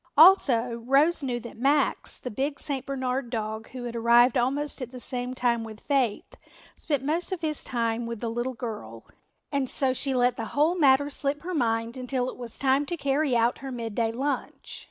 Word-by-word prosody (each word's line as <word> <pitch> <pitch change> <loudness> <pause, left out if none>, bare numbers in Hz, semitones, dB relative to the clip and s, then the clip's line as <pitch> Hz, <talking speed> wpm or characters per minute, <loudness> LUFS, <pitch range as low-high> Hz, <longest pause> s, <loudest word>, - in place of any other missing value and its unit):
Also 255 -9 +6
Rose 300 +6 +4
knew 250 -3 -2
that 235 -1 -10
Max, 280 +4 +1
the 250 - -6
big 275 +6 -2
St. 270 -3 -4
Bernard 260 -2 -2
dog 220 -1 -4
who 255 -1 -7
had 240 -1 -5
arrived 235 +2 +5
almost 275 +4 -1
at 250 -1 -5
the 255 - -8
same 250 0 -4
time 240 -2 +1
with 220 -1 -9
Faith, 260 -7 -1 0.4
spent 290 -4 -2
most 330 +6 -1
of 370 -3 -3
his 305 -2 -2
time 230 -1 -1
with 230 -2 -5
the 235 - -3
little 240 +2 -3
girl, 210 - -7 0.5
and 280 -3 0
so 265 -3 +2
she 265 +1 0
let 245 0 +2
the 225 - -3
whole 305 +4 +4
matter 285 -4 +4
slip 285 +2 -2
her 365 +1 -4
mind 230 -5 0
until 255 0 -2
it - - -12
was 240 -2 -4
time 270 +1 +2
to 345 - -3
carry 280 -2 +1
out 235 +1 +1
her 270 0 -6
midday 230 -2 -2
lunch. 275 +5 -4
255 Hz, 195 wpm, -26 LUFS, 235-280 Hz, 0.5 s, Also